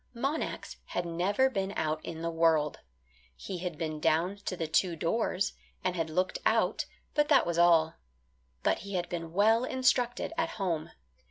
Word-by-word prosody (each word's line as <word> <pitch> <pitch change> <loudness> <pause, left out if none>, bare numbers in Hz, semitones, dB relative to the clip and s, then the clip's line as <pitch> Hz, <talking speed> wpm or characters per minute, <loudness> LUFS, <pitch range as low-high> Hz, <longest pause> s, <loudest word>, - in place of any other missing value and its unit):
Monax 275 +6 -3
had 175 - -3
never 185 +9 +2
been 195 -6 -2
out 155 0 -1
in 165 0 -6
the 170 - -1
world. 165 -2 +2 0.6
He 185 - -6
had 175 -3 -4
been 155 -2 -3
down 170 +6 +1
to 185 - -2
the 165 - -1
two 170 +2 +1
doors, 190 +3 0 0.3
and 185 -1 0
had 165 -2 -1
looked 185 +4 0
out, - - +2 0.3
but 295 -1 +3
that 290 - +5
was 170 0 -1
all. 165 -2 +5 0.7
But - - +2
he 200 0 -6
had 175 - -1
been 165 -2 -4
well 220 +6 +4
instructed 255 +1 +1
at 330 0 +1
home. 170 -6 -1
175 Hz, 170 wpm, -30 LUFS, 165-205 Hz, 0.7 s, that